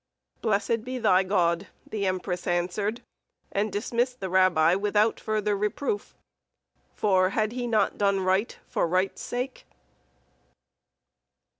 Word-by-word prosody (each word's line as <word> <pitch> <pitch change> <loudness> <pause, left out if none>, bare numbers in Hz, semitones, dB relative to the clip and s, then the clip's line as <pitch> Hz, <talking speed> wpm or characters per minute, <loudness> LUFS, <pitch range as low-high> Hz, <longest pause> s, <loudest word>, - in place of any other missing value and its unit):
"Blessed 220 +1 0
be 255 +1 -4
thy 190 -6 +4
God!" 175 -3 +1 0.2
the 200 -3 -2
empress 185 -1 -2
answered, 185 +6 -1 0.5
and 205 +1 0
dismissed 240 +4 -1
the 190 -2 -4
rabbi 180 -3 +4
without 210 +3 +2
further 210 -1 0
reproof; 210 - -2 0.8
for 185 -3 +3
had 215 +2 0
he 245 0 -3
not 225 -2 +1
done 200 -1 +2
right 190 +4 +1
for - - 0
right's 185 +3 0
sake? 250 +2 -4
200 Hz, 120 wpm, -27 LUFS, 185-220 Hz, 0.8 s, thy